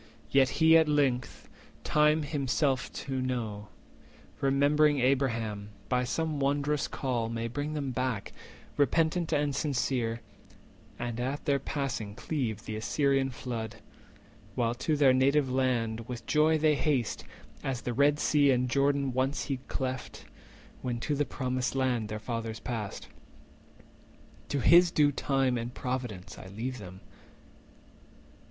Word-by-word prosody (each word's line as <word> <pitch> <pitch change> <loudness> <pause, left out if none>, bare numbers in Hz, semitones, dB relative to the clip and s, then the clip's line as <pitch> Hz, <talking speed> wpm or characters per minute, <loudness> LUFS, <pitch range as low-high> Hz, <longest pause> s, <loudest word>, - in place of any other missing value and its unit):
Yet 135 -1 +5
He 160 0 +6
at 160 -1 +2
length, 140 -4 0 0.4
time 150 +1 +3
to - - -6
himself 140 -1 0
best - - -8
known, 125 -6 -3 0.7
Remembering 145 +2 +3
Abraham, 115 -6 0 0.2
by 125 -1 +1
some 155 +3 -1
wondrous 145 +1 0
call 120 -4 -2
May 115 0 -3
bring 145 +5 -3
them 140 -3 -2
back, 125 -4 -2 0.5
repentant 160 +3 +2
and 145 -2 +1
sincere, 125 -5 -1 0.8
And 120 -1 -4
at 135 +4 -3
their 140 -1 +2
passing 135 -7 -3
cleave 115 -4 -3
the 110 - -4
Assyrian 135 +4 +1
flood, 115 -3 -5 0.8
While 120 -2 +1
to 155 -2 +1
their 140 -3 +5
native 135 +1 +3
land 120 -3 0
with 120 -2 -6
joy 155 +3 +3
they 155 0 +3
haste, 140 -6 0 0.4
As 130 -3 -2
the 125 - -3
Red 145 +4 +3
Sea 145 -2 +3
and 125 -1 +2
Jordan 140 -1 +2
once 130 +3 0
he 135 -3 -2
cleft, 130 -1 -4 0.6
When 120 -2 -2
to 150 - -1
the 145 +1 +1
Promised 130 -1 -2
Land 125 -5 0
their 105 - -3
fathers 115 0 -4
passed. 115 -5 -5 1.4
To 140 - -1
his 175 +5 +7
due 150 -3 +3
time 135 -3 +1
and 115 +1 -4
providence 125 -7 -5
I - - -10
leave 115 +6 -5
them." 95 -2 -10
130 Hz, 135 wpm, -29 LUFS, 120-145 Hz, 1.4 s, his